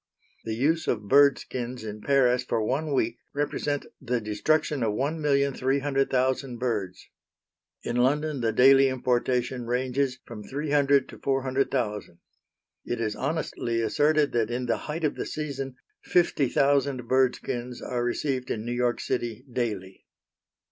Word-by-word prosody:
The 110 -1 -2
use 155 +7 +1
of 105 -3 -1
bird 140 +3 +6
skins 125 -1 -6
in 105 -1 -6
Paris 125 -1 +3
for 115 -3 -1
one 145 +6 -1
week 115 -3 0 0.2
represent 145 0 -1 0.2
the 125 -2 -1
destruction 130 +7 0
of 110 -2 +1
one 150 +6 -1
million 140 -2 +2
three 135 +2 +1
hundred 135 -1 0
thousand 130 -1 0
birds; 110 -7 -3 0.8
in 120 - -2
London 145 +3 +1
the 115 -1 +1
daily 135 +3 +6
importation 125 -1 0
ranges 130 +2 0
from 115 -3 -8
three 145 +6 -4
hundred 140 -2 +3
to - - -11
four 135 -1 0
hundred 135 +1 0
thousand. 105 -9 -3 0.7
It 120 - -3
is 110 -2 -1
honestly 125 -7 -2
asserted 145 +7 +2
that, 115 -2 0
in 125 +1 -2
the 120 - +1
height 160 +2 -3
of 150 - +1
the - - -4
season, 135 -4 -4 0.3
fifty 160 -6 +2
thousand 140 -3 +1
bird 130 0 +3
skins 120 0 -5
are 120 -1 -3
received 130 +1 -2
in 110 0 -3
New 120 - -2
York 120 0 0
City 120 -1 -3
daily. 105 -6 -4
130 Hz, 160 wpm, -26 LUFS, 120-140 Hz, 0.8 s, bird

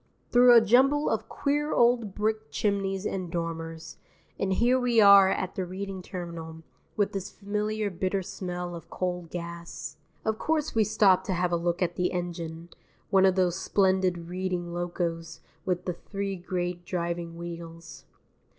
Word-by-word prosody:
Through 245 0 +8
a - - +8
jumble 265 +7 +4
of - - -2
queer 295 +1 -1
old 235 -4 +3
brick 215 -5 -1
chimneys 195 +4 -1
and 185 -4 -3
dormers, 165 -1 -5 0.4
and 195 - 0
here 245 +6 +3
we 245 -2 +2
are 200 -2 +8
at 185 -1 -2
the 190 - -2
Reading 190 +1 -5
Terminal, 170 -3 -7 0.3
with 205 -1 +1
its 195 0 -3
familiar 210 +1 -2
bitter 190 +2 -1
smell 180 -1 -5
of 170 -3 -9
coal 180 -2 -3
gas. 170 0 -7 0.3
Of 220 0 0
course 310 -1 0
we 220 -2 +3
stop 190 -3 +4
to 190 - -1
have 180 0 0
a - - +2
look 175 +1 0
at 175 0 -2
the 180 +1 0
engine, 170 -1 -5 0.4
one 190 -1 +6
of 185 - +2
those 180 -1 +1
splendid 185 -3 +1
Reading 180 -1 -3
locos 175 -1 -3 0.3
with 180 -1 -1
the 180 - -1
three 195 +2 -4
great 180 -1 -3
driving 170 -1 -3
wheels. 170 -1 -9
185 Hz, 160 wpm, -28 LUFS, 170-200 Hz, 0.4 s, Through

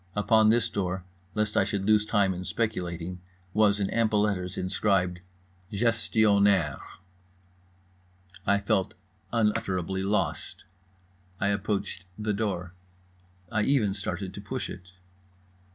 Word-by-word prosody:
Upon 110 +1 +4
this 115 0 +3
door, 95 -2 -2 0.3
lest 105 0 0
I - - +5
should 100 0 -2
lose 105 0 +4
time 100 -4 +2
in 90 0 -5
speculating, 90 -5 -3 0.3
was 105 -1 +4
in 100 - +1
ample 110 -2 +2
letters 95 -3 -1
inscribed: 95 -1 +1 0.5
GESTIONNAIRE 100 - +3 1.7
I 100 0 +4
felt 95 -1 0 0.4
unutterably 95 -5 0
lost. 100 +2 -1 0.8
I 100 - +1
approached 100 -2 -2
the 105 0 -1
door. 95 -5 -2 0.8
I 105 - +1
even 110 -4 +2
started 95 -1 -4
to 100 - -7
push 125 +5 -4
it. 90 0 -11
100 Hz, 115 wpm, -28 LUFS, 95-105 Hz, 1.7 s, I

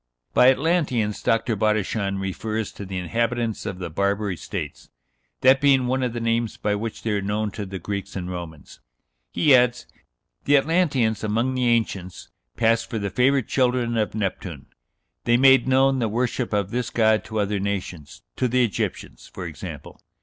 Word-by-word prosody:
By 125 - +6
Atlanteans 135 - +1
Dr. 115 0 +1
Bodichon 105 -1 0
refers 110 +3 -3
to 100 - -9
the 95 -1 -4
inhabitants 115 +4 -1
of 100 -3 -4
the 90 -3 -6
Barbary 100 +2 0
States - - -6 0.5
that 130 +1 +5
being 135 -3 +4
one 130 +1 0
of 125 -2 -1
the 120 - -3
names 115 0 -1
by 105 - -1
which 110 +2 -4
they 110 - 0
were 100 - 0
known 105 +1 -2
to 100 0 -6
the 95 0 -6
Greeks 100 +2 -5
and 90 -2 -4
Romans. 85 -5 -8 0.5
He 150 -4 +4
adds: 125 -1 +3 0.6
"The 145 0 +5
Atlanteans, 140 - +1
among 115 +5 0
the 125 -1 0
ancients, 105 -6 -1 0.3
passed 115 +1 +2
for 115 - -3
the 100 -2 -3
favorite 130 +4 +2
children 125 -2 +1
of 110 -1 -1
Neptune; 90 -8 -4 0.6
they 120 - +4
made 135 -1 +6
known 135 0 +3
the 115 -3 0
worship 120 +2 -1
of 100 -1 -1
this 120 -1 -2
god 110 -3 +2
to 110 - -5
other 100 0 0
nations 90 -10 -5
to 130 - +1
the 125 +1 +3
Egyptians, 105 - -4
for - - -7
example. - - -9
110 Hz, 170 wpm, -23 LUFS, 100-125 Hz, 0.6 s, By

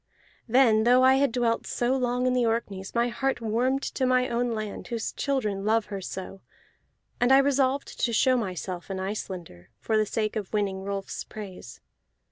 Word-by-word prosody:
Then, 225 -3 +4
though 250 +2 +5
I 260 +1 +6
had 275 -2 +2
dwelt 235 -1 0
so 245 +2 0
long 250 -1 0
in 255 - +2
the 250 -1 +2
Orkneys, 215 -4 -2
my 235 +1 +2
heart 270 +2 -1
warmed 245 +5 0
to 260 - -1
my 255 0 +2
own 240 +1 0
land 215 -3 -4
whose 230 -2 -3
children 215 -9 -1
love 220 +1 +2
her 195 - -4
so; 190 +1 -7 0.8
and 245 +1 +3
I 265 - +8
resolved 275 0 +1
to 240 - +2
show 255 +3 +3
myself 185 -5 -4
an 190 -1 -3
Icelander, 180 - -6
for 220 - 0
the 215 -1 +2
sake 215 0 -1
of 210 -2 -4
winning 200 -2 -1
Rolf's 195 0 -4
praise. 190 - -10
230 Hz, 180 wpm, -27 LUFS, 200-255 Hz, 0.8 s, I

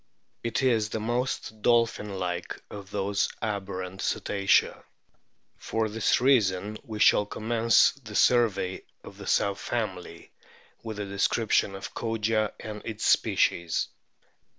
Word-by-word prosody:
It 115 +3 -1
is 115 -5 +2
the 110 - -3
most 120 -1 -2
dolphin 115 -4 +1
like 90 -1 -4
of 100 -2 -9
those 100 0 0
aberrant 95 -3 -4
Cetacea. 100 -1 +1 0.8
For 110 -1 -1
this 110 +1 +1
reason 105 -6 +2
we 110 -5 -7
shall 105 -1 +5
commence 115 +1 +3
the 120 -6 -12
survey 100 -7 +2 0.2
of - - -12
the - - -9
sub 100 0 +2
family 95 -7 -4 0.5
with 110 -2 -6
a 105 - -3
description 100 +1 +1
of 95 - -7
Kogia 110 -1 0
and 105 -1 -7
its 110 -1 -4
species. 85 -1 +2
105 Hz, 125 wpm, -27 LUFS, 100-115 Hz, 0.8 s, shall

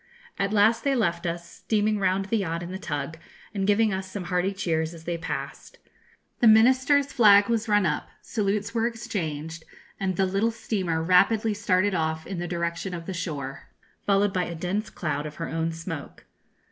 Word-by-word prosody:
At 195 0 +1
last 215 +2 +4
they 275 -1 +2
left 170 -7 0
us, 170 0 -4
steaming 215 -1 0
round 190 0 +1
the 225 +3 0
yacht 170 -4 -2
in 175 - -6
the 190 - -5
tug, 145 -2 -4 0.3
and 195 -2 -1
giving 210 0 +3
us 190 0 -4
some 190 0 -5
hearty 180 +2 0
cheers 165 -4 -1
as 160 - -12
they 170 +1 -2
passed. 170 +1 -6 0.6
The 240 - +5
Minister's 260 +6 +5
flag 205 -4 +7
was 230 -1 0
run 205 -2 +4
up, 150 -3 -1
salutes 205 0 -2
were 230 0 +1
exchanged, 165 -9 -4 0.4
and 190 -2 -1
the 190 - +2
little 195 +4 +1
steamer 190 -8 -2
rapidly 205 +5 +4
started 200 -1 +1
off 160 -2 -1
in 190 -2 -5
the 175 - -3
direction 170 +2 -3
of 165 -1 -7
the 190 - -4
shore, 145 -6 -5 0.4
followed 200 0 +3
by 180 -1 0
a 170 - -5
dense 195 +5 -2
cloud 150 -4 -3
of 150 - -9
her 165 - -4
own 165 0 -1
smoke. 165 -2 -7
190 Hz, 185 wpm, -26 LUFS, 165-210 Hz, 0.6 s, flag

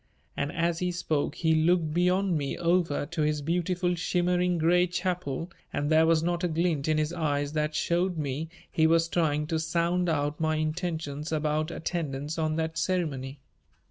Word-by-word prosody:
And 140 +1 -2
as 170 -1 0
he 180 0 0
spoke 160 -4 -1
he 160 -1 +2
looked 160 0 +2
beyond 180 +2 +2
me 140 -3 -2
over 170 -4 +1
to 160 +2 -4
his 150 -1 0
beautiful 175 +2 0
shimmering 180 0 +1
gray 175 +2 +3
chapel 175 -3 -3 0.2
and 145 +2 -1
there 160 +1 +5
was 165 -1 +3
not 175 0 -1
a - - +3
glint 160 -3 0
in 155 -1 +2
his 155 +2 0
eyes 145 -3 -1
that 150 0 -1
showed 175 +1 0
me 150 +1 -3 0.2
he 160 0 +3
was 165 0 +3
trying 155 -3 +1
to 160 +1 -1
sound 170 +2 0
out 145 -1 -1
my 155 -1 +1
intentions 155 -1 -3
about 155 0 0
attendance 155 -3 -3
on 155 -1 0
that 160 0 -2
ceremony. 145 -7 -1
160 Hz, 175 wpm, -28 LUFS, 150-175 Hz, 0.2 s, there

